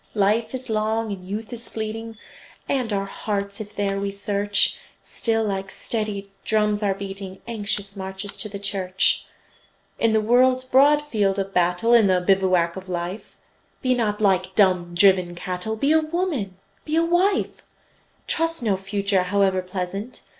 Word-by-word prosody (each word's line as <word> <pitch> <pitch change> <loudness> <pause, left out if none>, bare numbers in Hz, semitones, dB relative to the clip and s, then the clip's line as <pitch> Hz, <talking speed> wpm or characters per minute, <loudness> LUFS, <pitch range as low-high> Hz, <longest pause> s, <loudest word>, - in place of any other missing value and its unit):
Life 215 +4 +2
is 260 0 -7
long, 220 0 0
and 190 -2 -6
youth 210 +5 -5
is 235 0 -9
fleeting, 225 +1 -5 0.5
And 255 -5 0
our 195 -1 0
hearts, 200 0 -4
if 210 0 -9
there 195 -1 -1
we 200 0 -1
search, 200 0 +1 0.3
Still 225 -1 -1
like 195 -2 -2
steady 205 -2 -4
drums 210 -1 +1
are 200 -2 +1
beating 195 -1 -7
Anxious 205 -3 -3
marches 190 +1 -6
to 215 - -3
the 200 - -6
Church. 195 -2 +1 0.7
In 230 - +3
the 220 - +3
world's 255 +4 +3
broad 280 +3 +4
field 205 -9 0
of 195 0 -3
battle, 180 +6 +2
In 230 -4 +6
the 185 -1 +3
bivouac 180 -2 +2
of 190 0 -8
life, 175 +3 -5 0.5
Be 255 -1 +3
not 215 -4 0
like 190 -2 +1
dumb, 180 -4 +3
driven 185 -1 +4
cattle; 180 +4 -3
Be 275 +7 +1
a 320 - +6
woman, 310 - -2 0.3
be 310 - -2
a 330 +1 +3
wife! 365 +4 +1 0.6
Trust 330 -3 -1
no 205 -4 +2
Future, 195 0 0
howe'er 190 0 +2
pleasant! 185 +5 -5
205 Hz, 160 wpm, -23 LUFS, 190-225 Hz, 0.7 s, In